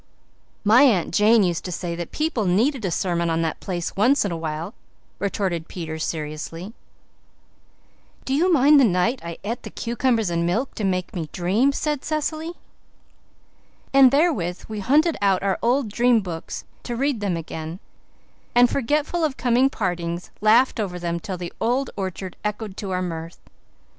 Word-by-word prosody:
"My 225 +4 +6
Aunt 220 -14 +3
Jane 215 +3 +5
used 175 -3 0
to 180 - -4
say 175 0 -3
that 170 -1 -6
people 305 -9 -1
needed 225 +8 +2
a - - 0
sermon 170 -1 0
on 165 0 +1
that 160 - -2
place 175 -3 -4
once 245 +5 +3
in 200 - -1
a - - -2
while," 165 +4 -4 0.5
retorted 190 -4 -2
Peter 160 -3 -6
seriously. 160 +5 -5 1.5
"Do 265 - -1
you 345 +6 +3
mind 295 -1 +6
the - - +6
night 225 +4 +2
I 170 -1 -6
et 230 +4 -3
the - - -8
cucumbers 235 -4 0
and 170 0 0
milk 205 +11 -1
to 215 - -5
make 185 +1 -1
me 160 -4 -4
dream?" 200 +10 +2
said 295 0 -2
Cecily. 310 +2 -2 1.4
And 270 -1 +8
therewith 270 - +1
we 215 -1 -5
hunted 300 - +3
out 195 -2 +2
our 195 -1 0
old 250 +2 +2
dream 240 0 +3
books 170 -4 -6 0.2
to 240 - -4
read 270 -1 0
them 195 -4 -1
again, 160 +1 -6 0.8
and, 245 0 +6
forgetful 295 +6 0
of 295 -4 0
coming 250 +2 +3
partings, 175 -6 -3
laughed 230 +4 +4
over 190 -4 -2
them 170 -1 -2
till 185 +2 -5
the 175 -1 -6
old 250 +3 0
orchard 190 -1 -5
echoed 210 -1 -4
to 200 - -5
our 185 0 -1
mirth. 165 -1 -6
205 Hz, 170 wpm, -23 LUFS, 175-255 Hz, 1.5 s, And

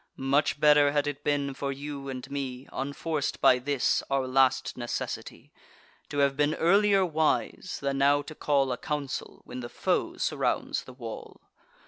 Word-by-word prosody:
Much 140 +2 +1
better 145 -1 +6
had 145 -1 +2
it 145 0 -4
been 140 -1 0
for 140 +1 -3
you 140 0 -6
and 130 +1 -7
me, 135 -2 -4
Unforc'd 145 +2 -2
by 125 - +5
this 135 0 +1
our 135 -1 +1
last 130 0 +2
necessity, 120 -1 -5 0.6
To 145 - -5
have 140 -1 +3
been 150 +2 +1
earlier 195 +2 +4
wise, 160 +2 0
than 140 0 0
now 145 +1 +4
to 150 - -9
call 140 -3 +1
A 125 - -2
council, 145 -3 -4
when - - -7
the 120 -1 -6
foe - - -1
surrounds - - -1
the 130 - -11
wall. 115 -3 -9
140 Hz, 160 wpm, -28 LUFS, 135-145 Hz, 0.6 s, better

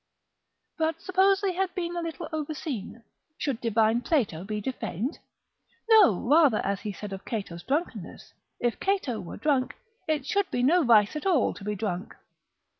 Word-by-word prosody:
But 320 0 0
suppose 385 +2 +3
they 395 -2 +1
had 370 0 -2
been 345 -1 -3
a 345 - -2
little 330 0 -5
overseen, 290 -7 -4 0.3
should 265 -5 -2
divine 225 0 +2
Plato 225 - 0
be 210 +2 -3
defamed? 240 - -4 0.7
no, 415 - +5
rather 290 -5 +5
as 200 0 -1
he 210 - -4
said 200 0 -7
of 195 - -7
Cato's 195 -7 -5
drunkenness, 295 - -4 0.3
if 240 -1 -1
Cato 375 - 0
were 175 - -8
drunk, 275 -4 0 0.3
it 305 -4 0
should 400 +5 0
be 245 - -1
no 335 +6 +4
vice 220 -1 +5
at 305 +5 -3
all 330 -10 +3
to - - -11
be 210 +1 -2
drunk. 200 -1 -4
265 Hz, 165 wpm, -27 LUFS, 215-335 Hz, 0.7 s, no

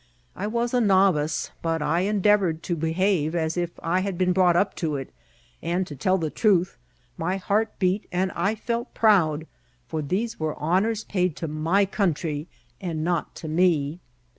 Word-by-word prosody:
I 200 - -3
was 235 +2 -1
a 250 - +3
novice, 190 -7 +2
but 165 -2 -1
I 160 +3 +1
endeavoured 195 -4 +2
to 175 - -1
behave 165 0 0
as 160 -1 0
if 175 -1 -1
I 175 +3 +1
had 190 -1 -2
been 180 0 +2
brought 180 -2 +4
up 195 +3 +2
to 155 -4 -1
it; 135 -1 -6 0.5
and, 175 +3 -1
to 150 - -8
tell 185 +8 +1
the 160 -4 -2
truth, 190 -4 +2 0.4
my 180 +4 0
heart 210 +3 0
beat, 185 +2 0
and 185 +1 0
I 200 +7 0
felt 235 +2 -4
proud; 165 -8 +3 0.4
for 160 +2 -3
these 195 +10 -2
were 155 -1 -2
honours 195 +8 +1
paid 180 -5 0
to 165 - -4
my 160 +6 +2
country, 165 -6 -1 0.3
and 165 -4 -3
not 170 -1 -1
to 160 - -7
me. 160 -2 +1
180 Hz, 175 wpm, -25 LUFS, 160-195 Hz, 0.5 s, brought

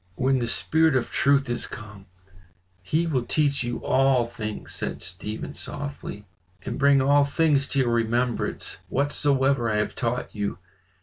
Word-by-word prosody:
"When 130 +1 +1
the 120 - -2
spirit 160 +5 +2
of 125 -2 0
truth 140 0 +2
is 120 - -1
come 105 -4 -10 0.7
he 155 - 0
will 145 -7 0
teach 140 +2 +1
you 120 0 -4
all 135 -2 +3
things," 110 -2 -6
said - - -4
Stephen 90 +5 -4
softly. 140 -7 -6 0.4
"'And - - -5
bring 140 -1 +4
all 145 +1 +5
things 140 -1 +2
to 140 - -1
your 120 -2 +1
remembrance, 120 +1 0
whatsoever 140 -3 +2
I 110 - 0
have 105 0 -1
taught 125 0 -3
you. 105 -3 -3
130 Hz, 150 wpm, -25 LUFS, 115-140 Hz, 0.7 s, all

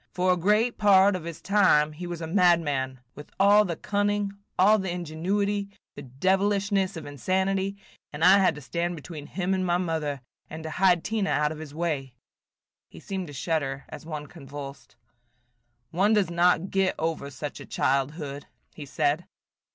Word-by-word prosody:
For 180 0 +3
a - - +1
great 210 +7 +1
part 200 -1 +5
of 175 -3 -6
his 170 -1 -8
time 185 -7 +4
he 175 +4 -7
was 175 -1 -6
a - - -3
madman, 160 -8 +2
with 150 - -11
all 205 +2 +6
the 170 -3 -3
cunning, 205 +2 -1 0.3
all 210 +4 +5
the 190 -1 -3
ingenuity, 190 +5 -2 0.2
the - - -9
devilishness 195 - 0
of 160 - -7
insanity, 190 +7 -1 0.3
and 150 +2 -4
I 180 - +8
have - - +3
had 185 -4 +3
to 150 - -9
stand 170 +6 -2
between 150 -1 -9
him 190 0 -2
and 190 -1 0
my 175 -1 +1
mother, 160 -6 -2 0.3
and 160 0 -8
to 160 - -5
hide 180 -1 +3
Tina 215 -3 -1
out 150 0 +1
of 155 - -7
his 150 -2 -9
way." 145 -7 -3 0.7
He - - -13
seemed 190 -3 -5
to 145 - -10
shudder 140 -2 -2
as - - -9
one 155 -2 -6
convulsed. 140 -1 -10 1.0
"One 195 +6 +2
does 200 -5 +2
not 175 +1 +2
get 195 -1 +1
over 160 -3 -2
such 145 +2 -7
a - - -9
childhood," 140 +1 -1 0.3
he 145 -2 -9
said. 150 +4 0
175 Hz, 175 wpm, -26 LUFS, 150-195 Hz, 1.0 s, I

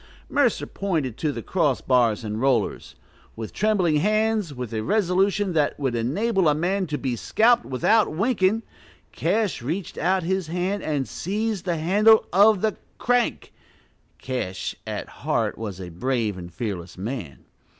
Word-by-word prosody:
Mercer 275 -6 +2
pointed 160 - -2
to 150 +3 -1
the - - -6
cross 155 -8 +1
bars 120 -4 +2
and 105 +1 -4
rollers. 130 -6 0 0.4
With 110 -1 -7
trembling 190 -7 +2
hands, 215 +1 +1
with 125 -4 -6
a 110 - -1
resolution 195 - +1
that 150 -2 +1
would 135 -4 -1
enable 185 - +1
a 150 - +2
man 185 +4 0
to 150 -1 -2
be 130 -4 -2
scalped 235 - +3
without 205 - +2
winking, 205 +3 +1 0.5
Cash 200 - 0
reached 160 +9 -4
out 185 0 +1
his 190 0 -1
hand 180 +4 -2
and 145 -4 -1
seized 210 +1 -3
the 175 -3 0
handle 210 +7 +5
of 205 +1 +5
the 220 -2 0 0.2
crank 245 0 0 0.6
(Cash, 125 -8 -4
at - - -4
heart, - - -1
was 105 -4 -6
a 90 -2 -7
brave 115 +3 -1
and 90 -1 -9
fearless 90 -3 -5
man). 95 - -6
165 Hz, 150 wpm, -24 LUFS, 125-205 Hz, 0.6 s, handle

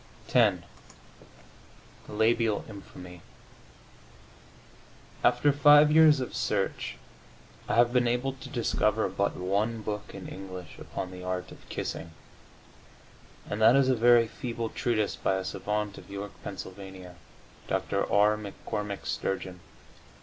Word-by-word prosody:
X - - +5 1.5
THE - - -9
LABIAL 110 0 +2
INFAMY 90 -4 -11 2.0
After 145 - +4
five 145 +1 +7
years 155 -2 +7
of 130 - -4
search - - -1 0.7
I - - +1
have 120 +1 +4
been 125 -1 +3
able 125 +3 0
to 130 - -11
discover 110 -4 +1
but 100 +2 -1
one 105 +5 -1
book 105 -1 -5
in - - -8
English 95 -3 -9
upon 95 - -6
the 90 0 -9
art 90 0 -4
of - - -15
kissing, 85 0 -5 1.3
and 105 +1 -4
that 115 +3 +7
is 135 -1 +4
a 130 - +4
very 120 0 +5
feeble 115 0 -4
treatise 110 -3 -1
by 95 - 0
a 95 0 -3
savant 105 -1 -3
of - - -15
York, 100 0 -6
Pa., 100 - -5 1.1
Dr. - - -1
R. 105 +1 +4
McCormick 105 -1 -5
Sturgeon. 95 -1 -3
105 Hz, 125 wpm, -28 LUFS, 100-120 Hz, 2.0 s, five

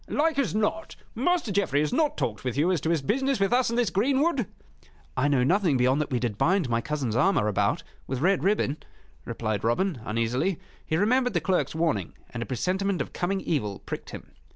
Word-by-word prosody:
"Like 310 -1 +1
as 250 -6 0
not, 220 +10 -1 0.2
Master 315 - 0
Geoffrey 190 -8 +1
has 150 - -1
not 310 -2 +1
talked 110 -2 -2
with 125 0 -3
you 165 +6 +3
as 175 -6 0
to 160 - -1
his 165 -4 +1
business 265 - +1
with 195 +4 +2
us 250 -1 +3
in 235 - -2
this 235 -7 +1
greenwood?" 270 - +1 0.7
"I 145 - +2
know 140 -4 +3
nothing 175 -1 +2
beyond 130 +4 +3
that 150 - -3
we 125 - 0
did 120 -4 -2
bind 185 -3 +2
my 115 0 +1
cousin's 140 -7 -2
armor 140 - +3
about 105 - 0 0.2
with 130 -1 -3
red 190 +6 +2
ribbon," 190 -8 +1 0.5
replied 110 -1 -3
Robin, 130 - 0
uneasily. 115 - -1 0.2
He 155 - -1
remembered 245 +4 +2
the - - +4
clerk's 180 0 0
warning, 160 - 0 0.2
and 115 - -5
a 115 - -4
presentiment 185 - -1
of - - -4
coming 190 +2 -1
evil 105 - -1
pricked - - -7
him. - - -10
170 Hz, 205 wpm, -26 LUFS, 130-210 Hz, 0.7 s, the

